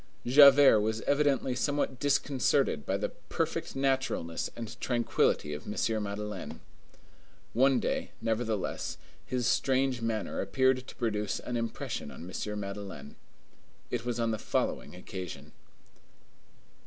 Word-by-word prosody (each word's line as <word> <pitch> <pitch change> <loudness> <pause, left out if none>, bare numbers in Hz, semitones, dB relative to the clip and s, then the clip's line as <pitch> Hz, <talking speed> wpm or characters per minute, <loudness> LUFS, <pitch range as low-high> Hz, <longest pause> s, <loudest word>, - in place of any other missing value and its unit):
Javert 140 -2 +8
was 110 +1 -1
evidently 140 -3 +2
somewhat 135 0 -1
disconcerted 140 - +1
by - - +1
the - - -2
perfect - - -3
naturalness 135 -11 0
and 115 -2 -7
tranquillity 120 - +1
of 75 0 -7
M. 110 +1 0
Madeleine. 105 -1 -5 0.9
One 130 +2 +4
day, - - -1
nevertheless, 110 -2 -2 0.3
his 125 -1 -2
strange 130 0 +2
manner 115 -2 -2
appeared 130 +5 +1
to - - -10
produce 105 -3 -1
an 125 - -4
impression 115 -1 -3
on 85 - -9
M. 105 +3 -4
Madeleine. 100 -8 -7 0.8
It 120 -2 -1
was 120 -1 -2
on 115 -1 +1
the 110 - -2
following - - -2
occasion. 90 -1 -7
115 Hz, 120 wpm, -30 LUFS, 105-130 Hz, 0.9 s, Javert